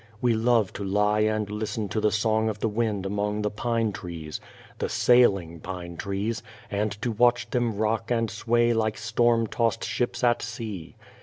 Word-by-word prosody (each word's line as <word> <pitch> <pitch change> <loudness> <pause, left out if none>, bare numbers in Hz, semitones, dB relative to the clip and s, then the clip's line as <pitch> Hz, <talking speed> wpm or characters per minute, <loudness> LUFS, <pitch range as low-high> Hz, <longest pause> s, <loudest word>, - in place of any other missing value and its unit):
We 120 0 +2
love 115 -2 +2
to 100 - -5
lie 105 +2 +2
and 110 -1 +1
listen 105 +1 -3
to 110 - -1
the 105 - +4
song 110 +1 +1
of 105 - -3
the 110 - 0
wind 105 -3 -1
among 105 +1 -1
the 105 - 0
pine 115 0 0
trees 85 -5 -7 0.4
the - - -1
"sailing" 100 -9 +3
pine 90 -1 -6
trees 100 +5 -2 0.3
and 105 +1 0
to 120 - 0
watch 120 +2 +3
them 120 -4 0
rock 110 +1 0
and 115 -2 +1
sway 120 +2 +2
like 110 -1 0
storm 120 -1 +2
tossed 115 +1 0
ships 120 0 -2
at 120 -1 +3
sea. 110 -7 -6
110 Hz, 175 wpm, -26 LUFS, 105-115 Hz, 0.4 s, the